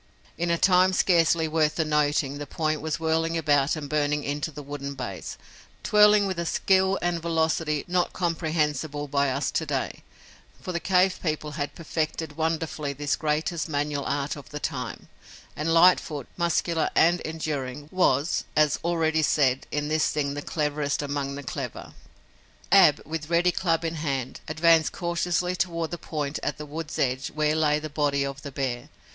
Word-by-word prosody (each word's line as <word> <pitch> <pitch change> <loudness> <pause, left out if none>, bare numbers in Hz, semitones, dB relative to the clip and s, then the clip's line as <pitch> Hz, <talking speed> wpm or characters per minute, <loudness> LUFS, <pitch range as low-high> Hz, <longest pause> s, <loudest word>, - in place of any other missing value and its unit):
In 170 +1 -2
a 170 - +2
time 185 +1 +4
scarcely 170 -3 +3
worth 155 -1 +1
the 160 - 0
noting 145 -2 +1
the 145 - -6
point 155 +1 -1
was 160 +1 -2
whirling 165 +1 0
about 145 -2 +2
and 150 -2 -6
burning 150 0 0
into 145 +2 -2
the 150 -1 -9
wooden 140 0 -6
base, 100 -8 -6 0.5
twirling 210 -1 +5
with 190 -3 -2
a 170 - -2
skill 190 +2 +2
and 175 -1 0
velocity 160 -2 0
not 180 0 +1
comprehensible 155 -4 -1
by 140 0 +1
us 135 +2 -1
to - - 0
day, - - -3 0.6
for 185 - -5
the 170 - -2
cave 185 +1 +2
people 155 -2 -2
had 145 -1 -4
perfected 160 -1 -3
wonderfully 160 -2 -2
this 145 +1 -1
greatest 155 +2 -1
manual 145 -1 -1
art 140 0 -1
of 145 - -11
the 150 - -6
time, 125 -4 -5 0.5
and 155 +2 -1
Lightfoot, 165 -5 +4
muscular 170 -1 0
and 175 +2 +4
enduring, 145 -3 -4
was, 160 -5 +2
as 150 -1 +3
already 160 -2 +1
said, 135 -4 +2
in 150 0 -1
this 155 0 +2
thing 140 -2 -1
the 145 - -4
cleverest 150 -1 -1
among 140 -1 -3
the 145 - -7
clever. 125 - -6 0.8
Ab, - - +6
with 155 0 -5
ready 175 +1 +3
club 165 -2 0
in 165 0 -2
hand, 135 -5 -3
advanced 160 0 +3
cautiously 175 0 -1
toward 170 -2 -2
the 175 - -4
point 150 -2 -3
at - - -2
the 150 - -7
wood's 155 +1 -6
edge 130 0 0
where 155 0 0
lay 150 -1 +2
the 155 +1 -5
body 145 -2 0
of 140 0 -6
the 140 - -7
bear. 130 0 -3
155 Hz, 170 wpm, -26 LUFS, 145-165 Hz, 0.8 s, Ab